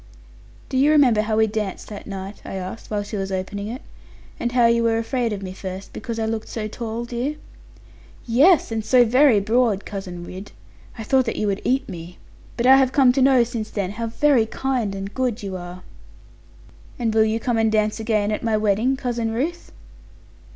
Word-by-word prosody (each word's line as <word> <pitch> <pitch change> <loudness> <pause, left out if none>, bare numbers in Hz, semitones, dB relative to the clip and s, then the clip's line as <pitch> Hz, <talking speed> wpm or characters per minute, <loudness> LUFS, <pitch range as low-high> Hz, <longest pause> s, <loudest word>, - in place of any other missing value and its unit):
'Do 265 - -1
you 285 +3 +4
remember 265 -8 +5
how 215 0 -1
we 220 - +5
danced 210 -3 -4
that 205 -2 -9
night?' 195 +1 -7
I - - -7
asked, 190 +4 -7
while 210 -1 -1
she 205 +1 -6
was 195 0 -3
opening 195 +2 -4
it; 245 +6 -6 0.6
'and 240 0 -2
how 245 -2 +4
you 235 0 +4
were 230 -1 +2
afraid 235 +1 -1
of 200 -2 -4
me 185 -1 -6
first, 190 0 -7
because 235 -3 -5
I 225 - -1
looked 220 0 -3
so 215 -2 -4
tall, 230 +1 -5
dear?' 245 +5 -3 0.9
'Yes, 275 +6 +4
and 220 -1 -2
so 245 +2 +5
very 250 -1 +5
broad, 220 -1 +1
Cousin 185 -3 -6
Ridd. 185 +3 -9 0.4
I 225 - -5
thought 260 +3 +2
that 230 - -2
you - - -1
would 200 -1 -1
eat 265 +2 0
me. 175 -2 -9 0.4
But 235 - 0
I 265 +1 +8
have 265 -1 +3
come 265 -2 +5
to 265 +2 0
know, 260 -2 +5
since 230 -2 -5
then, 200 -3 -3
how 230 +2 -4
very 240 0 +2
kind 240 -5 -2
and 195 +1 -6
good 250 -5 -2
you 195 -2 -4
are.' 180 0 -8 1.1
'And 230 -2 -1
will 220 0 +5
you 220 +1 0
come 235 -1 0
and 220 -1 +2
dance 215 0 +1
again, 215 -2 0
at 210 - -2
my 225 -2 +1
wedding, 215 +5 +1
Cousin 240 -4 -2
Ruth?' 300 +10 -3
225 Hz, 205 wpm, -22 LUFS, 205-245 Hz, 1.1 s, I